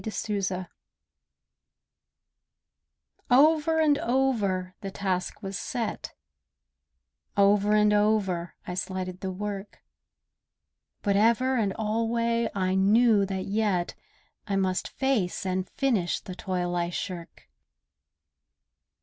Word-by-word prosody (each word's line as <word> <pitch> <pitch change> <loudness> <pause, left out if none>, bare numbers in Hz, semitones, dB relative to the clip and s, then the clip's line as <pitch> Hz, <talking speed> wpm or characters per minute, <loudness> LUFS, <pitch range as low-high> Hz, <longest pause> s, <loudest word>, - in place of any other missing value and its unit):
THE 220 - -3
PURPOSE 195 -4 -2 2.6
Over 310 +4 +4
and 295 -2 +3
over 215 -8 0
the 195 - -4
task 190 +1 -3
was 195 -1 -4
set, 230 +3 -4 1.2
Over 205 +1 +4
and 210 0 +4
over 205 -5 +1
I 180 - -5
slighted 185 0 -4
the 190 - -3
work, 200 +1 -6 1.2
But 200 -2 +2
ever 235 +5 +3
and 215 -5 +1
alway 230 +2 0
I 185 -1 0
knew 205 +1 +4
that 190 -1 -3
yet 200 -4 0 0.5
I 200 - -1
must 190 -1 0
face 235 -9 -1
and 185 0 -2
finish 230 -11 0
the 185 - -8
toil 180 -2 -2
I 170 0 0
shirk. 175 -1 -6
200 Hz, 105 wpm, -27 LUFS, 185-230 Hz, 2.6 s, Over